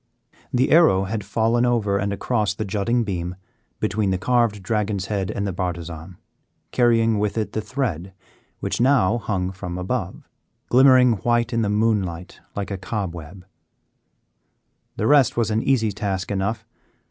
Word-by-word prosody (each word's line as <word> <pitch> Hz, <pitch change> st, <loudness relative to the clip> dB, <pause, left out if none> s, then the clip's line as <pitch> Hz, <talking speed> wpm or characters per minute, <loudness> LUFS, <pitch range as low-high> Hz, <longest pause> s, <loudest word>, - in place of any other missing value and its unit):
The 130 Hz, +1 st, +1 dB
arrow 155 Hz, -, +5 dB
had 105 Hz, +2 st, -3 dB
fallen 115 Hz, +4 st, +1 dB
over 110 Hz, -5 st, +1 dB
and 100 Hz, +1 st, -1 dB
across 105 Hz, -1 st, -1 dB
the 110 Hz, -, -3 dB
jutting 110 Hz, +5 st, 0 dB
beam 90 Hz, -3 st, -4 dB, 0.4 s
between 100 Hz, 0 st, 0 dB
the 95 Hz, -, +1 dB
carved 115 Hz, -1 st, +1 dB
dragon's 105 Hz, -3 st, -1 dB
head 95 Hz, -2 st, -1 dB
and 100 Hz, -, -3 dB
the 95 Hz, -, -2 dB
bartizan, 85 Hz, -1 st, -5 dB, 0.5 s
carrying 115 Hz, -3 st, +3 dB
with 105 Hz, +1 st, -1 dB
it 110 Hz, -, -1 dB
the 110 Hz, -, -2 dB
thread, 105 Hz, -, -3 dB, 0.5 s
which -, -, -2 dB
now 120 Hz, -4 st, +3 dB
hung 95 Hz, -4 st, -2 dB
from 90 Hz, -2 st, -6 dB
above, 95 Hz, 0 st, -4 dB, 0.4 s
glimmering 125 Hz, -2 st, +6 dB
white 120 Hz, +3 st, 0 dB
in 115 Hz, -, +1 dB
the 105 Hz, -, 0 dB
moonlight 100 Hz, -5 st, -1 dB, 0.2 s
like 100 Hz, 0 st, -4 dB
a 95 Hz, -, -4 dB
cobweb. 90 Hz, -3 st, -6 dB, 1.5 s
The 105 Hz, -, -1 dB
rest 135 Hz, -2 st, +4 dB
was 115 Hz, -2 st, +1 dB
an 110 Hz, +1 st, +1 dB
easy 115 Hz, -5 st, +1 dB
task 100 Hz, -1 st, -3 dB
enough. 100 Hz, +3 st, -2 dB
105 Hz, 150 wpm, -22 LUFS, 95-115 Hz, 1.5 s, glimmering